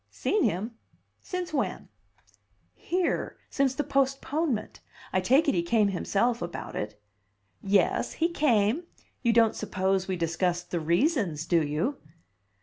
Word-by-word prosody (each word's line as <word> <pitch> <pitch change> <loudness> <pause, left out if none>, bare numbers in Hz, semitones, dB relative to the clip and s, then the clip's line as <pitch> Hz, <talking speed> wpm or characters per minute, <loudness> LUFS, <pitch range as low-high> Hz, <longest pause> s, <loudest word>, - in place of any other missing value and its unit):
"Seen 420 - 0
him? 220 +7 -2 0.4
Since 360 -3 -4
when?" 275 - -2 0.9
"Here. 360 0 -1
Since 270 -2 +1
the 295 - 0
postponement. 275 -2 -1 0.3
I 185 - +2
take 265 +11 +4
it - - +4
he 175 - +2
came 205 +4 +2
himself 210 +5 0
about 175 0 -5
it." 105 0 -4 0.6
"Yes, 195 0 +2
he 335 - +1
came. 280 - +2 0.4
You 235 - +3
don't 225 -1 +4
suppose 190 -2 0
we 190 - -1
discussed 175 +1 -1
the 175 - 0
reasons, 170 - +1
do 170 -1 +3
you?" 155 - -1
215 Hz, 135 wpm, -28 LUFS, 175-275 Hz, 0.9 s, take